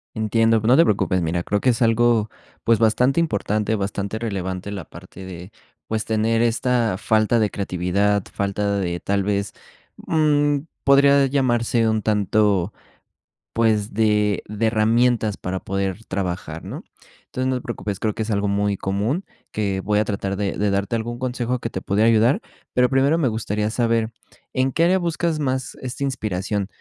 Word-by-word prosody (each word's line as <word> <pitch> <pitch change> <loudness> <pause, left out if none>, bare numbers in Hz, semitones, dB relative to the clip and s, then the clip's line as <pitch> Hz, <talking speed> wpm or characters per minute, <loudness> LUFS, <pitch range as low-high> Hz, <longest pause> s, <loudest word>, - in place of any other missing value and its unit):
Entiendo, 115 +1 +2
pero 110 +3 +2
no - - +7
te 165 - +7
preocupes, 95 -3 +1
mira, 85 +1 -1
creo 105 - 0
que 130 - +3
es 120 +1 -1
algo, 115 -1 +3 0.3
pues, 115 -1 +3
bastante 125 +7 +3
importante, 110 -6 0
bastante 100 +1 -3
relevante 95 -3 -4
la 95 -5 -5
parte 95 +2 -12
de, 90 +1 -9 0.3
pues, 110 -1 -2
tener 115 +1 +1
esta 120 -3 +1
falta 110 +1 +2
de 110 -2 +2
creatividad, 100 +1 0
falta 100 0 -1
de, 85 -2 -2
tal 100 +2 0
vez, 100 0 -1 0.5
mm, 145 -2 +2 0.2
podría 140 0 +5
llamarse 120 -4 +1
un 110 -1 0
tanto, 105 -2 +1 0.8
pues, 110 -3 +1
de 105 -2 +2
de 105 +2 -1
herramientas 110 0 +2
para 95 +1 -4
poder 95 +1 -3
trabajar, 90 -4 -4
¿no? - - -7 0.4
Entonces, 130 0 -3
no 130 - +1
te 125 - -3
preocupes, 105 -5 -5
creo 110 -1 0
que 110 - -3
es 110 - -4
algo 100 0 0
muy 100 0 +1
común, 105 - -1 0.3
que 100 -3 -1
voy 105 +2 +1
a 105 - +1
tratar 100 -1 -2
de 100 0 -1
de 105 0 +1
darte 100 +4 0
algún 120 +1 -4
consejo 125 0 -2
que 115 - -4
te 95 - -4
pudiera 110 +3 +2
ayudar, 115 +4 +3 0.3
pero 125 0 +3
primero 135 +4 +3
me 140 -7 +2
gustaría 105 -1 -2
saber, 115 -1 0 0.4
¿en 130 0 0
qué 165 - +2
área 180 +3 +4
buscas 170 -2 -1
más 130 -2 -2
esta 130 +2 -5
inspiración? 105 -6 -2
110 Hz, 170 wpm, -22 LUFS, 100-120 Hz, 0.8 s, no